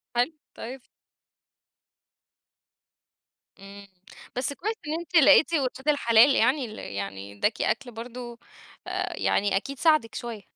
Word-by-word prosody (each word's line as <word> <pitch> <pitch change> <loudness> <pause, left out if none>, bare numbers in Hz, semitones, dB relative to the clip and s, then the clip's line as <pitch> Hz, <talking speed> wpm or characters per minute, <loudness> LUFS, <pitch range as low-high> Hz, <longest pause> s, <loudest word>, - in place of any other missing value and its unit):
حلو، 245 +7 +1 0.2
طيب 255 +3 -8 2.8
إمم، 200 0 -12 0.5
بس 265 +3 0
كويس 430 +9 -3
إن 300 - -2
أنتِ 345 +1 -9
لقيتِ 305 +2 +6
ولاد 265 -1 -2
الحلال 265 -2 +5
يعني 265 -1 +2
ال 215 -1 -9
يعني 100 0 -6
اداكِ 215 - 0
أكل 260 -3 -1
برضو 240 +1 -8 0.5
آآ، - - -3
يعني 200 -1 +1
أكيد 275 +6 -6
ساعدِك 310 -8 +2
شويّة. 235 -3 -6
245 Hz, 120 wpm, -26 LUFS, 220-285 Hz, 2.8 s, لقيتِ